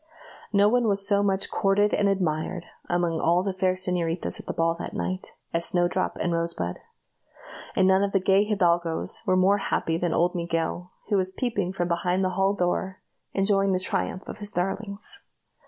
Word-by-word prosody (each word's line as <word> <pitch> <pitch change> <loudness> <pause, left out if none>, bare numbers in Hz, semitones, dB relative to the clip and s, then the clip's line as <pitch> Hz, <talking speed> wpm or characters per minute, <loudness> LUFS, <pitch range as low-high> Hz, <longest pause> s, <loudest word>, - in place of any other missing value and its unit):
No 205 -1 +5
one 240 +1 +2
was 200 -1 +1
so 200 -1 +3
much 195 -1 +1
courted 205 +1 +2
and 205 -1 +2
admired, 175 -2 -1 0.2
among 175 -2 0
all 175 +2 +2
the 195 -1 -2
fair 185 0 +1
señoritas 180 -2 -2
at - - -11
the - - -1
ball 165 0 +1
that - - -6
night, 185 0 -4 0.2
as 170 0 +1
Snowdrop 175 +2 +1
and 175 - 0
Rosebud; 165 - -2 1.0
and 190 - +4
none 190 0 +4
of 200 0 0
the 195 - +3
gay 195 +2 +4
hidalgoes 175 -5 0
were 185 - +3
more 195 +2 +4
happy 165 -4 -1
than 175 -1 0
old 175 +2 +2
Miguel, 170 0 -2 0.2
who 205 - +3
was 185 -1 0
peeping 200 -3 -2
from 175 -2 -2
behind 180 +2 0
the - - +1
hall 195 +2 +1
door, 185 +1 -2 0.3
enjoying 195 0 +2
the 185 - +1
triumph 185 0 -1
of - - -7
his 205 -1 -5
darlings. 200 - -2
185 Hz, 185 wpm, -26 LUFS, 175-200 Hz, 1.0 s, No